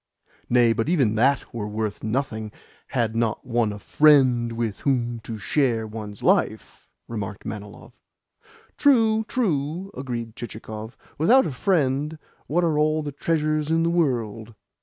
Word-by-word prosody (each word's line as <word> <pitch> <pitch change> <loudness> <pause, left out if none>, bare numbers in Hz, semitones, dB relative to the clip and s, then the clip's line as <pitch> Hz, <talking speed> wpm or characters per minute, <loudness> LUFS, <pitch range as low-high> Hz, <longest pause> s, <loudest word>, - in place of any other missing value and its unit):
"Nay, 120 -1 +4
but 115 +6 -1
even 135 -11 +2
THAT 135 +5 +1
were 110 -3 -4
worth 105 0 -3
nothing 110 -2 -2 0.4
had 115 -4 -1
not 115 -1 -1
one 120 -3 +1
a 105 - -6
friend 130 -1 +4
with 115 -3 -3
whom 120 -4 0
to 110 0 -7
share 115 +2 0
one's 105 -2 -8
life," - - 0 0.2
remarked 105 -3 -6
Manilov. 105 -1 -8 0.9
"True, 225 -6 +4
true," 180 - -1
agreed 120 -4 -5
Chichikov. 110 -1 -8 0.2
"Without 245 - +5
a - - -2
friend, 150 -1 0 0.3
what 175 +4 +1
are 160 -3 +1
all 155 +1 +2
the 145 - -4
treasures 155 0 0
in 165 0 +2
the 170 - +1
world? 115 -9 -1
125 Hz, 140 wpm, -24 LUFS, 110-155 Hz, 0.9 s, Without